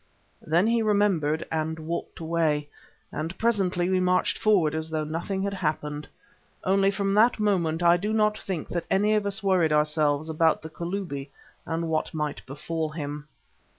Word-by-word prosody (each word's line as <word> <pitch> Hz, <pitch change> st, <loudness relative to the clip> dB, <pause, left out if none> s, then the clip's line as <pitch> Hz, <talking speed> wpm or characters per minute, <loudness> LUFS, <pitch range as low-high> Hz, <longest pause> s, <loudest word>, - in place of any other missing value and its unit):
Then 170 Hz, +5 st, +2 dB
he 230 Hz, +1 st, +2 dB
remembered 195 Hz, -8 st, +1 dB
and 160 Hz, 0 st, -1 dB
walked 160 Hz, +2 st, -5 dB
away, 160 Hz, -3 st, 0 dB, 0.4 s
and 160 Hz, +4 st, -4 dB
presently 190 Hz, -6 st, +1 dB
we 185 Hz, 0 st, +2 dB
marched 180 Hz, 0 st, +1 dB
forward 185 Hz, -8 st, +3 dB
as 160 Hz, 0 st, -3 dB
though 155 Hz, -1 st, -1 dB
nothing 170 Hz, +5 st, -3 dB
had 200 Hz, 0 st, -1 dB
happened. 150 Hz, -4 st, -3 dB, 0.6 s
Only 195 Hz, +1 st, +3 dB
from 195 Hz, 0 st, 0 dB
that 225 Hz, +3 st, +4 dB
moment 175 Hz, -6 st, +1 dB
I 170 Hz, 0 st, +6 dB
do 205 Hz, +4 st, -2 dB
not 215 Hz, -1 st, +2 dB
think 185 Hz, -6 st, -4 dB
that 170 Hz, -1 st, -3 dB
any 205 Hz, +2 st, +3 dB
of 210 Hz, -1 st, +1 dB
us 200 Hz, +1 st, -2 dB
worried 185 Hz, -5 st, +3 dB
ourselves 150 Hz, 0 st, +2 dB
about 160 Hz, 0 st, +2 dB
the 160 Hz, -, -8 dB
Kalubi 170 Hz, -5 st, -4 dB, 0.4 s
and 165 Hz, 0 st, -2 dB
what 160 Hz, 0 st, -1 dB
might 150 Hz, -2 st, -3 dB
befall 155 Hz, +3 st, -3 dB
him. 150 Hz, -1 st, -6 dB
170 Hz, 165 wpm, -26 LUFS, 155-195 Hz, 0.6 s, I